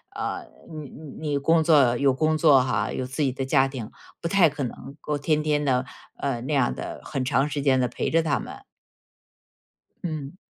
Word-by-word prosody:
呃 -, -, -4 dB, 0.3 s
你 150 Hz, -3 st, -7 dB
你 155 Hz, +1 st, -8 dB
你 145 Hz, -, +1 dB
工 160 Hz, +3 st, +3 dB
作 140 Hz, -7 st, +5 dB
有 140 Hz, 0 st, +3 dB
工 155 Hz, +3 st, +1 dB
作 145 Hz, -5 st, +6 dB
哈， 130 Hz, -, -1 dB
有 130 Hz, -, -3 dB
自 135 Hz, +4 st, -4 dB
己 135 Hz, -, +2 dB
的 135 Hz, 0 st, -3 dB
家 135 Hz, -1 st, +3 dB
庭， 125 Hz, -5 st, -7 dB, 0.3 s
不 170 Hz, -, -2 dB
太 185 Hz, -2 st, +5 dB
可 145 Hz, 0 st, -4 dB
能 135 Hz, +2 st, -7 dB
够 150 Hz, -1 st, -2 dB
天 150 Hz, +1 st, 0 dB
天 150 Hz, -1 st, +1 dB
地， 130 Hz, -1 st, +1 dB, 0.3 s
呃， 135 Hz, -4 st, -2 dB
那 135 Hz, +5 st, -3 dB
样 135 Hz, -4 st, +2 dB
的 -, -, -7 dB
很 135 Hz, -3 st, -3 dB
长 135 Hz, +3 st, +1 dB
时 145 Hz, 0 st, -2 dB
间 135 Hz, -2 st, +3 dB
地 125 Hz, -, +2 dB
陪 -, -, -2 dB
着 165 Hz, 0 st, +2 dB
他 150 Hz, -3 st, +1 dB
们。 -, -, -9 dB, 1.4 s
嗯。 155 Hz, -1 st, -5 dB
140 Hz, 215 characters per minute, -25 LUFS, 130-155 Hz, 1.4 s, 作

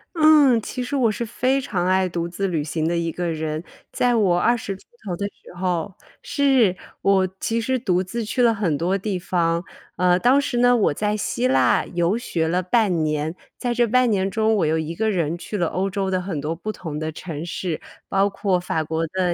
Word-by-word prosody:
嗯， 300 Hz, -7 st, +6 dB
其 250 Hz, +3 st, -4 dB
实 270 Hz, +3 st, -3 dB
我 240 Hz, -5 st, +3 dB
是 235 Hz, +3 st, -3 dB
非 255 Hz, +4 st, 0 dB
常 185 Hz, -9 st, -2 dB
爱 185 Hz, 0 st, +3 dB
独 170 Hz, -1 st, -3 dB
自 195 Hz, +2 st, -2 dB
旅 160 Hz, -5 st, -1 dB
行 160 Hz, +1 st, -2 dB
的 170 Hz, -, 0 dB
一 165 Hz, -1 st, -1 dB
个 175 Hz, +1 st, -3 dB
人。 155 Hz, 0 st, -3 dB, 0.3 s
在 245 Hz, -1 st, +2 dB
我 190 Hz, -6 st, +3 dB
20 230 Hz, -3 st, +1 dB
出 190 Hz, -, -17 dB, 0.2 s
头 185 Hz, -4 st, -3 dB
的 200 Hz, -, -2 dB
时 200 Hz, -, -10 dB
候 180 Hz, 0 st, -1 dB, 0.3 s
是， 265 Hz, -9 st, +3 dB, 0.3 s
我 195 Hz, -1 st, +3 dB
其 230 Hz, +1 st, -1 dB
实 255 Hz, +3 st, 0 dB
独 185 Hz, -5 st, +1 dB
自 230 Hz, +5 st, -4 dB
去 215 Hz, +4 st, -4 dB
了 230 Hz, -1 st, +5 dB
很 180 Hz, -8 st, 0 dB
多 175 Hz, +5 st, 0 dB
地 195 Hz, -1 st, -2 dB
方。 170 Hz, -1 st, 0 dB, 0.3 s
呃， 180 Hz, 0 st, +3 dB
当 255 Hz, +6 st, +4 dB
时 275 Hz, -3 st, -2 dB
呢， 245 Hz, 0 st, +5 dB
我 205 Hz, -, +2 dB
在 210 Hz, +6 st, -1 dB
希 215 Hz, +4 st, -1 dB
腊 130 Hz, -, +3 dB
游 175 Hz, +3 st, +2 dB
学 170 Hz, -8 st, -1 dB
了 180 Hz, +3 st, +1 dB
半 185 Hz, -3 st, +2 dB
年， 155 Hz, +2 st, -1 dB, 0.2 s
在 245 Hz, -2 st, -1 dB
这 240 Hz, 0 st, +2 dB
半 255 Hz, +2 st, +3 dB
年 195 Hz, -2 st, +1 dB
中， 220 Hz, +2 st, +1 dB
我 185 Hz, -, +2 dB
又 160 Hz, -, +1 dB
一 160 Hz, +1 st, -3 dB
个 220 Hz, +6 st, 0 dB
人 170 Hz, -5 st, 0 dB
去 205 Hz, +4 st, -5 dB
了 175 Hz, -, +1 dB
欧 190 Hz, +2 st, -1 dB
洲 195 Hz, -1 st, -2 dB
的 185 Hz, -1 st, 0 dB
很 180 Hz, -5 st, -4 dB
多 155 Hz, +3 st, -3 dB
不 215 Hz, +6 st, -4 dB
同 160 Hz, -7 st, -6 dB
的 155 Hz, 0 st, -3 dB
城 160 Hz, -1 st, -6 dB
市， 170 Hz, -1 st, -4 dB, 0.3 s
包 195 Hz, +1 st, +2 dB
括 195 Hz, -2 st, 0 dB
法 165 Hz, -3 st, -2 dB
国 160 Hz, +1 st, -2 dB
的 180 Hz, +1 st, 0 dB
190 Hz, 235 characters per minute, -22 LUFS, 170-225 Hz, 0.3 s, 嗯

